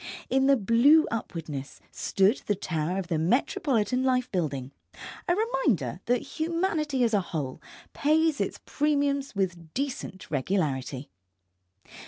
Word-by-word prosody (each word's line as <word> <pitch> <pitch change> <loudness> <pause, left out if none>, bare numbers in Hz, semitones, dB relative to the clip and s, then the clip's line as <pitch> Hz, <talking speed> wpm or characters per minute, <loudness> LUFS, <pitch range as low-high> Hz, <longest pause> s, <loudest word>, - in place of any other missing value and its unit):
In 265 +1 +3
the 275 -1 +5
blue 240 +9 +5
upwardness 155 -10 -5
stood 195 +5 +2
the 205 - +2
tower 170 -1 -2
of 190 -3 -3
the 165 -3 0
Metropolitan 250 - +1
Life 255 -1 +1
Building, 140 -8 -2 0.6
a 350 - +3
reminder 315 - 0
that 245 0 +1 0.2
humanity 315 -5 0
as 230 -1 +2
a 205 - +4
whole 150 -7 -4 0.3
pays 310 +1 +2
its - - -2
premiums 285 -3 0
with 175 -4 -2
decent 255 - -4
regularity. 140 - -1
225 Hz, 125 wpm, -27 LUFS, -, 0.6 s, the